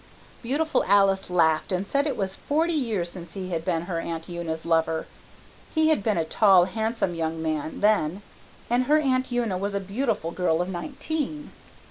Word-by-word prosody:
"Beautiful 290 +6 0
Alice 195 -1 +3
laughed 160 -2 +2
and 185 +1 0
said 280 +7 +1
it 275 - -2
was 190 -2 -1
forty 320 - 0
years 220 - -1
since 175 -2 -9
he 185 -2 -5
had 165 -2 -2
been 165 -2 -1
her 170 -2 -3
Aunt 165 -1 -5
Una's 170 -2 -4
lover. 165 -1 +1 0.7
He 315 0 +4
had 310 -9 +3
been 210 -2 0
a 165 - +1
tall, 190 +1 +5
handsome 220 0 -1
young 165 -1 -2
man 155 -1 -3
then, 205 -3 +2 0.4
and 245 +2 +2
her 300 +4 +4
Aunt 260 -4 +1
Una 230 -7 0
was 200 +1 -2
a - - +1
beautiful 200 -3 -2
girl 170 -2 +1
of 180 +1 -1
nineteen. 295 - -4
195 Hz, 180 wpm, -25 LUFS, 170-245 Hz, 0.7 s, tall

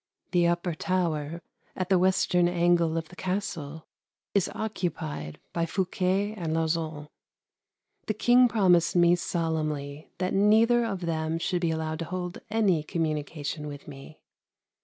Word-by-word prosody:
The 175 -2 +3
upper 175 0 0
tower, 165 -2 -1 0.3
at 185 0 -3
the 190 -2 +4
western 180 -1 +3
angle 170 -2 +2
of 160 -1 -4
the - - -13
Castle, 170 -5 -4 0.5
is 200 -3 +2
occupied 165 - -4
by 170 -1 0
Fouquet 190 +3 0
and 165 -6 -3
Lauzun. 160 -2 -1 1.0
The 215 - -1
King 245 +3 +5
promised 185 -7 +3
me 175 0 +5
solemnly 155 -4 -3
that 185 0 -1
neither 225 +4 +4
of 195 -5 -3
them 160 -1 -1
should 175 +1 -1
be 170 - +1
allowed 160 0 -2
to 165 - -3
hold 180 +1 -5
any 205 -7 +2
communication 150 -1 -3
with 145 -1 -9
me. 140 +1 -12
170 Hz, 140 wpm, -27 LUFS, 160-185 Hz, 1.0 s, King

